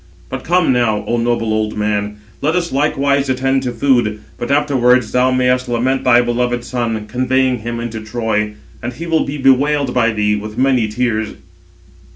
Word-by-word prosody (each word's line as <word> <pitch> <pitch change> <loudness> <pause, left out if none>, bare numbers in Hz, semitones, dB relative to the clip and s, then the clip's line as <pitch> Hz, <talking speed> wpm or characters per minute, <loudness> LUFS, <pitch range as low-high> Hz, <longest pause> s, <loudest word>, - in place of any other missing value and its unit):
But - - -5
come 175 -5 +2
now, 110 -4 +1
O 120 - 0
noble 115 -2 0
old 110 0 -1
man, 105 0 -1 0.2
let 155 +4 +1
us 175 -1 -1
likewise 140 0 +1
attend 135 +1 +1
to 125 -2 -3
food, 120 -4 +1 0.2
but 120 - -4
afterwards 130 -5 +2
thou 125 +1 +3
mayest 125 0 +1
lament 130 +3 0
thy 120 -1 +5
beloved 120 0 -1
son, 115 -4 -3
conveying 130 +2 0
him 115 +1 -5
into 115 -1 -5
Troy; 110 -1 -2 0.3
and 120 +1 -4
he 165 +8 -7
will 165 -1 +1
be 145 +2 -4
bewailed 135 0 +2
by 120 -2 +3
thee 105 -1 +1
with 105 +1 -6
many 130 -3 +2
tears." 110 -1 -2
125 Hz, 175 wpm, -17 LUFS, 110-135 Hz, 0.3 s, thy